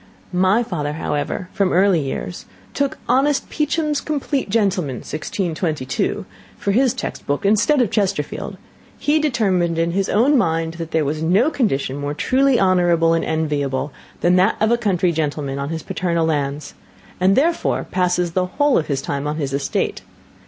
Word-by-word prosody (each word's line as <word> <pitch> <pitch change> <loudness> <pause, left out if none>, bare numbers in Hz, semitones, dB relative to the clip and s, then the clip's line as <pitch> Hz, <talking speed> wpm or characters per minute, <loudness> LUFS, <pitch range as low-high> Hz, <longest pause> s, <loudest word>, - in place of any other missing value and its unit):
My 190 +6 +3
father, 150 -9 -3
however, 150 +4 -3
from 195 -2 +1
early 185 -1 +4
years, 145 +5 -5 0.3
took 280 -1 -1
honest 275 +2 +2
Peacham* 300 0 0
for 295 0 -2 2.5
his 250 +3 +3
textbook, 145 +6 -3
instead 220 +8 +3
of 220 - -3
Chesterfield: 195 -8 -2 0.4
he 300 +2 +2
determined, 195 - +1
in 165 +1 +1
his 195 +2 -1
own 255 +8 +3
mind, 165 -4 0
that 165 -1 -4
there 160 -2 +1
was 155 +2 -2
no 195 - +3
condition 140 - 0
more 145 +1 -3
truly 265 - +2
honourable 175 -3 +3
and 165 - +1
enviable 145 -3 -1 0.3
than 180 +1 +4
that 190 +4 +3
of 220 +1 +2
a - - +5
country 185 -6 +1
gentleman 145 -3 -2
on 140 +1 -3
his 160 -1 -4
paternal 170 -2 -1
lands, 145 -2 -2 0.5
and, 190 +2 +4
therefore, 330 +5 +1
passes 180 -1 0
the 180 +1 0
whole 290 +8 +2
of 155 - -4
his 135 -2 -2
time 140 +1 -3
on 150 - -2
his 140 -4 -3
estate. 140 0 -1
180 Hz, 150 wpm, -20 LUFS, 150-220 Hz, 2.5 s, a